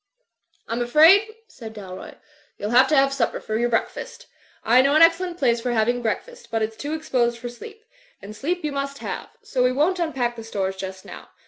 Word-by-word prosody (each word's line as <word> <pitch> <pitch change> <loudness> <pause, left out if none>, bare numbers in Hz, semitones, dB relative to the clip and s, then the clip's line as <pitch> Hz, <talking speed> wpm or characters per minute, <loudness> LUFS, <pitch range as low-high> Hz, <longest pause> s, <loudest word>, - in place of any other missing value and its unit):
'l*m 235 +1 -2
afraid," 320 - +6 0.2
said 225 - -11
Dalroy, 190 -3 -9 0.4
"youTl 205 +2 -3
have 255 +2 +6
to 305 - +2
have 275 -1 +4
your 275 - -5
supper 235 -4 -1
for 225 +3 -1
breakfast 230 - -3 0.4
I 245 +3 +5
know 275 +2 +2
an 315 - +7
excellent 340 +1 +2
place 240 -7 +1
for 245 0 -1
having 240 +2 +1
breakfast, 480 - -4
but 225 -1 -1
it's 220 0 -3
too 285 +7 -5
exposed 240 -6 0
for 240 +1 -6
sleep. 435 - -12 0.3
And 210 +2 -10
sleep 345 +9 -3
you 300 - -2
must 275 0 -4
have; - - -6
so 265 -12 -1
we 250 - +3
won't 315 +8 +1
unpack 265 -8 -1
the 225 - -7
stores 195 -3 -3
just 190 0 -7
now. - - -11
250 Hz, 205 wpm, -23 LUFS, 225-310 Hz, 0.4 s, an